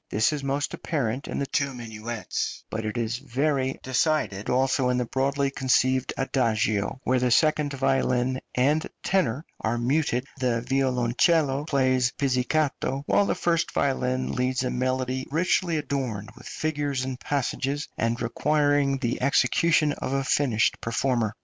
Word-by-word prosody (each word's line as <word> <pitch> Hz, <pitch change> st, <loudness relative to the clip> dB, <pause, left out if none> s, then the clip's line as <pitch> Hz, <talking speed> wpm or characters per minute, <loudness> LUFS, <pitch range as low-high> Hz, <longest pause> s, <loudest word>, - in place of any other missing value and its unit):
This 110 Hz, +8 st, +2 dB
is 145 Hz, -2 st, -4 dB
most 140 Hz, +1 st, -1 dB
apparent 135 Hz, -3 st, -2 dB
in -, -, -4 dB
the 140 Hz, -, -1 dB
two 140 Hz, -1 st, -1 dB
minuets, 115 Hz, -1 st, -4 dB
but 110 Hz, 0 st, -3 dB
it 110 Hz, +2 st, -3 dB
is 115 Hz, +1 st, -1 dB
very 135 Hz, 0 st, -1 dB
decided 130 Hz, -6 st, 0 dB
also 130 Hz, 0 st, +2 dB
in 125 Hz, -, +1 dB
the 125 Hz, -, 0 dB
broadly 135 Hz, +3 st, 0 dB
conceived 130 Hz, -1 st, +2 dB
adagio, 115 Hz, -4 st, 0 dB
where 130 Hz, 0 st, +2 dB
the 125 Hz, 0 st, +1 dB
second 150 Hz, +3 st, +3 dB
violin 130 Hz, -1 st, +1 dB
and 145 Hz, +5 st, +2 dB
tenor 150 Hz, -6 st, 0 dB
are 110 Hz, +2 st, -1 dB
muted, 125 Hz, 0 st, 0 dB
the 120 Hz, -2 st, 0 dB
violoncello 135 Hz, +3 st, +2 dB
plays 130 Hz, -4 st, +2 dB
pizzicato, 140 Hz, +1 st, 0 dB
while 200 Hz, -, +3 dB
the -, -, +1 dB
first 170 Hz, -1 st, 0 dB
violin 130 Hz, -1 st, 0 dB
leads 125 Hz, +1 st, 0 dB
a 125 Hz, -, -1 dB
melody 130 Hz, +1 st, -1 dB
richly 170 Hz, +1 st, +1 dB
adorned 130 Hz, -8 st, -3 dB
with -, -, -12 dB
figures 145 Hz, -4 st, -2 dB
and 130 Hz, -1 st, -5 dB
passages, 140 Hz, +1 st, -2 dB
and 115 Hz, +1 st, -1 dB
requiring 145 Hz, +1 st, +2 dB
the 120 Hz, -3 st, -2 dB
execution 150 Hz, +4 st, +3 dB
of 130 Hz, -, -4 dB
a 135 Hz, 0 st, +1 dB
finished 130 Hz, -4 st, +1 dB
performer. 115 Hz, -2 st, 0 dB
130 Hz, 145 wpm, -26 LUFS, 125-140 Hz, -, second